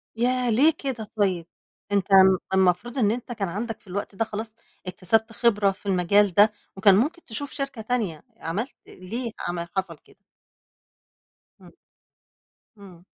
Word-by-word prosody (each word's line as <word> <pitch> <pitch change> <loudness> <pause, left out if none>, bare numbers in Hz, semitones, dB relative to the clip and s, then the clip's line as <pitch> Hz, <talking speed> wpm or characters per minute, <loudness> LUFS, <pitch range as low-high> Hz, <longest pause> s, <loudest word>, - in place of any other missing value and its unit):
ياه! 250 +1 +1
ليه 285 +8 +4
كده 240 -6 -4
طيب؟ 185 -5 +1 0.4
أنت 200 -1 +1
م 190 -1 +7 0.2
المفروض 190 +7 +2
إن 210 -4 +3
أنت 240 +1 -5
كان 200 -5 -2
عندك 225 +4 -5
في - - -26
الوقت 195 +1 -5
ده 225 - 0
خلاص 220 0 -6 0.4
اكتسبت 220 +5 +1
خبرة 210 -4 +3
في 195 - -16
المجال 195 +1 +3
ده، 210 +3 +6 0.2
وكان 195 0 +5
ممكن 305 - 0
تشوف 280 +6 -5
شركة 275 -5 -5
تانية، 215 -9 -2
عملت 205 +11 -4
ليه 230 +6 -6 0.2
عمل 170 -1 -3
حصل 175 -5 -2
كده؟ - - -24 1.5
إمم. - - -15 1.1
إمم. 185 -4 -14
210 Hz, 145 wpm, -25 LUFS, 190-235 Hz, 1.5 s, م